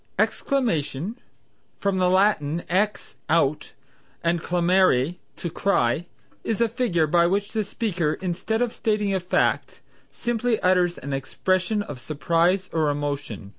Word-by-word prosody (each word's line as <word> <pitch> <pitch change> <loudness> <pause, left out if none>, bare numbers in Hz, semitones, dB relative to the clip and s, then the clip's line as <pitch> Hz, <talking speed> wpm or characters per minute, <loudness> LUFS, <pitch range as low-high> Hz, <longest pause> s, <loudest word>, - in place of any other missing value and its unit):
Exclamation 210 - 0 0.6
(from 200 -2 0
the 180 -1 +3
Latin 180 -5 +2
ex, 205 +4 -1
out, 155 -2 +1 0.5
and 170 0 +1
clamare, 175 -4 +2 0.2
to 170 - -4
cry), 170 -4 +1 0.4
is 225 - -1
a 235 - +4
figure 225 - +1
by 170 +2 +3
which 200 +3 0
the 220 -1 0
speaker 185 -7 -1
instead 190 +6 -1
of 240 - -2
stating 210 -3 0
a 190 - +1
fact, 180 0 0 0.3
simply 240 -1 -1
utters 180 -1 +3
an 140 +1 -5
expression 185 +9 0
of 145 -9 -8
surprise 170 +7 +1
or 155 -2 +2
emotion. 145 -8 -3
180 Hz, 130 wpm, -24 LUFS, 155-205 Hz, 0.6 s, a